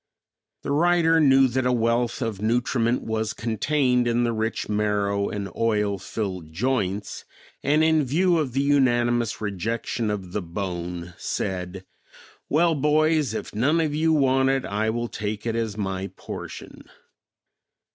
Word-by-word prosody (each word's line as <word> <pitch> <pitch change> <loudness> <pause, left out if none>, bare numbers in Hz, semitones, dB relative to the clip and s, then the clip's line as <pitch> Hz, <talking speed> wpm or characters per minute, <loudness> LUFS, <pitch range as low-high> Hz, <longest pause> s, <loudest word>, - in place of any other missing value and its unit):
The - - -3
writer 165 +1 +3
knew 135 -3 +5
that 130 +1 0
a - - +2
wealth 120 +1 +1
of 110 -4 -4
nutriment 120 +1 +1
was 110 -1 -2
contained 125 +2 +1
in 120 +1 +2
the 120 -1 0
rich 110 0 -2
marrow 105 -1 0
and 100 -1 -4
oil 105 -3 0
filled 95 -6 -5
joints, 105 0 -2 0.4
and 150 +2 +3
in 160 -1 +3
view 170 +6 +2
of 135 -6 -2
the 135 +1 +1
unanimous 120 -4 +2
rejection 110 +3 -2
of 95 -4 -4
the 105 - -2
bone, 90 -1 -5
said, 95 0 -4 0.6
"Well, 165 +3 +3
boys, 150 -2 +2
if - - -5
none 140 +10 +2
of 155 -3 0
you 160 +2 +2
want 135 -3 +3
it, 135 -1 0
I 105 +2 -1
will 120 +1 -2
take 105 -1 -5
it 115 -1 -1
as 110 -3 -2
my 95 -2 -3
portion." - - -9
115 Hz, 145 wpm, -24 LUFS, 105-135 Hz, 0.6 s, knew